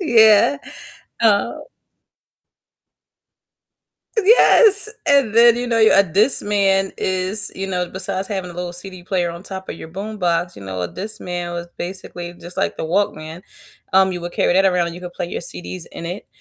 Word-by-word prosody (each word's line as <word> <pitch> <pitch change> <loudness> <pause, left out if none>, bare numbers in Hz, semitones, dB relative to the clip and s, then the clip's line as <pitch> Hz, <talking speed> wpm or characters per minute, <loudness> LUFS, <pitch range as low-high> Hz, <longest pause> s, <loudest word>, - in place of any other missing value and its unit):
Yeah, 225 - +5 0.6
uh 210 -3 +3 2.7
Yes! 430 -1 +6 0.2
And 275 -7 +3
then, 235 0 +6
you 245 +1 -3
know, 235 -1 0
a 220 -3 +6
Discman 195 - +1
is, 190 +2 -1
you 195 - -4
know, 180 -2 -2
besides 190 +1 -4
having 190 -3 -4
a - - -11
little 180 0 -5
CD 180 +1 -9
player 175 -1 -1
on 170 +1 -9
top 190 -1 -8
of - - -5
your - - -10
boombox, 180 -2 -2
you - - -10
know, 95 -1 -5
a 90 - -2
Discman 180 - -5
was 170 0 -5
basically 175 -1 -7
just 175 +1 -10
like - - -1
the - - -5
Walkman, 165 -2 -2 0.5
um, 190 0 +4
you 175 - -5
would 175 0 -6
carry - - +1
that 190 +1 +4
around 180 -2 +2
and 170 - -6
you 175 - -10
could 175 -1 -7
play 175 - -4
your - - -5
CDs 180 0 -7
in 170 - -7
it, 180 +4 -6
190 Hz, 170 wpm, -20 LUFS, 175-205 Hz, 2.7 s, Yes